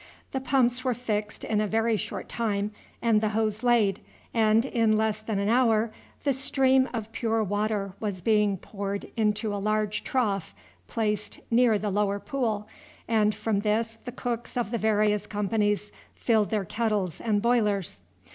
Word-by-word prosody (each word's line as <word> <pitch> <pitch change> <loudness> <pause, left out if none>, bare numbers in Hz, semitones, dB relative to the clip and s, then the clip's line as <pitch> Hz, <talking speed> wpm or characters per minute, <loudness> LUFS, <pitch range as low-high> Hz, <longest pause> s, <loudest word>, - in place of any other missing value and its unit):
The 265 - -2
pumps 255 -2 +2
were 255 -2 +1
fixed 215 -3 -3
in 215 -1 +1
a 215 - 0
very 225 +2 +2
short - - -4
time 210 -3 -1 0.3
and 225 -2 +4
the 215 - +1
hose 215 -1 0
laid, 230 -6 +3 0.3
and 220 +1 +4
in 225 -4 +2
less 215 -1 0
than 215 -1 -2
an 200 0 0
hour 225 -1 +3 0.3
the 280 - +2
stream 265 0 +3
of 225 -2 -5
pure 225 -1 0
water 205 -1 -1
was 200 -5 -4
being 210 -3 +3
poured 200 +1 -5
into 215 -1 0
a 200 - -3
large 215 0 0
trough 205 -9 -1 0.3
placed 210 -2 -2
near 230 -2 +5
the 205 0 -2
lower 200 0 +1
pool, 215 -1 -2 0.4
and 215 -2 +2
from 215 -1 0
this 225 +2 0
the 245 - -4
cooks 240 -1 -4
of 235 -3 -1
the 235 - -1
various 210 -1 +2
companies 210 0 0 0.2
filled 220 -3 +2
their 210 -3 0
kettles 210 -4 -1
and 210 -2 +1
boilers. 210 - +1
215 Hz, 165 wpm, -27 LUFS, 205-230 Hz, 0.4 s, near